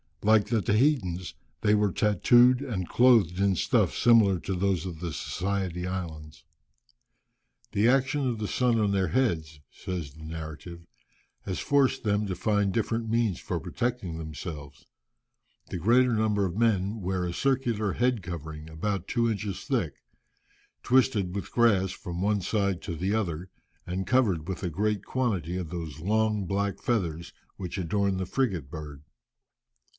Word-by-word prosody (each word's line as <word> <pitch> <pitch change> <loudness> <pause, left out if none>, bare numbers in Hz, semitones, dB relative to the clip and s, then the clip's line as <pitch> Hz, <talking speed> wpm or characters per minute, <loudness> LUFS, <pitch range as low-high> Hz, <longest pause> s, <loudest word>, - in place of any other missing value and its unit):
Like 110 0 +4
the 110 -1 +1
Tahitans 95 - +1 0.3
they 105 - +3
were 105 -2 +3
tattooed, 120 +6 +4
and 105 -10 -3
clothed 115 -8 +4
in 100 -1 +3
stuffs - - +1
similar 110 -6 +5
to 95 - -3
those 95 -2 0
of 85 -4 -6
the 85 -2 -4
Society 90 0 -2
Islands. 80 -5 -6 1.3
"The 105 +3 +2
action 135 +2 +2
of 120 -2 -1
the 105 -1 -3
sun 120 0 +1
on 105 -2 +2
their 95 -2 +1
heads," 80 - 0
says 85 -7 -6
the 80 +1 -13
narrative, 80 +2 -8 0.6
"has 95 - -3
forced 140 -2 +2
them 105 -1 +1
to 95 - -3
find 105 +1 +1
different 115 +2 -1
means 115 -5 +1
for - - -3
protecting 115 -9 -3
themselves. 75 -2 -8 0.8
The - - -4
greater 120 +7 +4
number 105 -2 +1
of 90 - -3
the 105 - -4
men 105 -2 +1
wear 90 0 -1
a 85 - -3
circular 120 -4 0
head 125 -2 +1
covering 80 -2 -7
about 95 +4 -3
two 115 -1 +1
inches 100 -3 -4
thick, - - -2 0.8
twisted 115 -7 +2
with 100 - -5
grass 100 -6 +3
from 85 0 -6
one 105 0 +1
side 100 -1 0
to 85 - -4
the 95 +5 -1
other, 90 -5 -2 0.4
and 95 +2 -3
covered 100 -11 +2
with 95 -1 -4
a 90 - 0
great 105 +5 -1
quantity 95 - -1
of 90 -4 -4
those 80 -3 -6
long, 105 +2 +1
black 100 +2 -1
feathers 85 -8 -2 0.2
which 90 0 -5
adorn 95 +2 0
the 95 - -2
frigate 95 - -1
bird. 75 -3 -8
100 Hz, 155 wpm, -27 LUFS, 85-110 Hz, 1.3 s, similar